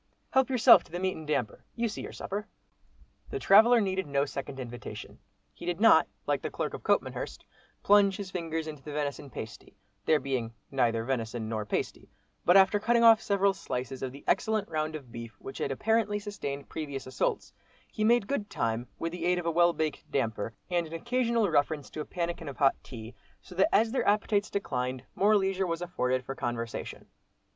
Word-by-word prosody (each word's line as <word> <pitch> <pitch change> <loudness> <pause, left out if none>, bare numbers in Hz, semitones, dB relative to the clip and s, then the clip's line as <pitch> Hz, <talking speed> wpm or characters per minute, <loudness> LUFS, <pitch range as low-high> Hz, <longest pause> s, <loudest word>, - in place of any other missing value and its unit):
Help 265 0 +3
yourself 250 -2 +7
to - - -21
the 175 - -3
meat 185 0 0
and 155 -1 -9
damper, 130 -8 -2
you 235 0 0
see 220 - -5
your - - -7
supper." 210 +3 -5 0.8
The 415 - -3
traveller 235 - +6
needed 190 -4 -1
no 140 0 +1
second 135 -1 -6
invitation; 120 -1 -8 0.3
he - - -13
did 175 0 -1
not, 225 - +6 0.2
like - - 0
the - - -3
clerk - - -3
of - - -6
Copmanhurst, - - -1 0.4
plunge 200 -1 +5
his 195 -3 -6
fingers 165 -3 -3
into 150 -3 -7
the 150 +1 -8
venison 145 -1 -3
pasty, 110 -2 -9 0.3
there 155 -1 +4
being 125 -4 -3 0.2
neither 115 -4 +1
venison 115 -3 -2
nor 110 -1 -3
pasty, - - -3 0.4
but 175 +2 +7
after 195 +2 +5
cutting 235 +2 +3
off 225 -1 +8
several 200 -1 +2
slices 130 -7 -5
of 130 - -3
the 140 +2 -12
excellent 220 -3 +1
round 155 -1 -2
of 135 -6 -9
beef 115 -1 -8
which 135 - -8
had - - -1
apparently 210 - +1
sustained 170 -10 -5
previous 140 -4 -5
assaults, 130 - -2 0.4
he 215 - -2
made 235 0 +4
good 210 -4 -2
time, 115 +2 -2
with 165 - -3
the 180 - -4
aid 180 0 +3
of 175 - -3
a 170 - +1
well 175 +1 +4
baked 155 -2 -2
"damper," 110 -4 -2 0.2
and 175 -2 +1
an 160 - -11
occasional 235 +3 +1
reference 150 -3 0
to 155 - -5
a - - -5
pannikin 170 -3 -3
of 140 - -9
hot 135 -1 +4
tea, 115 -2 -9 0.3
so 185 - -14
that 190 +2 +3
as 220 +2 +3
their 265 - 0
appetites 205 0 +2
declined, 130 -9 -2
more 210 +2 +4
leisure 190 -1 0
was 165 -1 -2
afforded 130 -7 -1
for 135 - -4
conversation. 120 -3 -4
165 Hz, 195 wpm, -29 LUFS, 135-205 Hz, 0.8 s, off